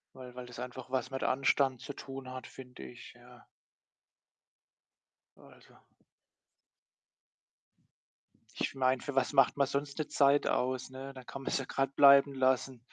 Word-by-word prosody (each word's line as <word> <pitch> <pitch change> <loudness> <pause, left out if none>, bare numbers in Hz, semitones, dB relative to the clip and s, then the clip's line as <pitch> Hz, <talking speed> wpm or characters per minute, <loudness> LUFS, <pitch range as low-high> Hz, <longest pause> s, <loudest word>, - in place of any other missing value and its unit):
weil 125 -1 -10
weil 125 -1 -8
das 125 - -11
einfach 125 0 -7
was 130 -1 -2
mit 135 - -4
Anstand 135 -1 +1
zu 145 - -7
tun 135 -2 -9
hat, 130 0 -8
finde 125 - -12
ich, 65 -1 -11
ja. - - -18 1.9
Also - - -19 2.8
ich - - -2
meine, 130 -1 +1
für 145 - -6
was 135 +1 +1
macht 135 0 +4
man 140 -1 +2
sonst 140 +2 -3
'ne 155 - -2
Zeit 140 0 +3
aus, 130 +1 -1
ne? 135 +1 -9
Da 130 -1 -11
kann 135 +2 -9
man's - - -1
ja 135 - -5
grad 135 +1 -2
bleiben 140 0 +7
lassen. 130 -1 0
130 Hz, 150 wpm, -31 LUFS, 130-140 Hz, 2.8 s, bleiben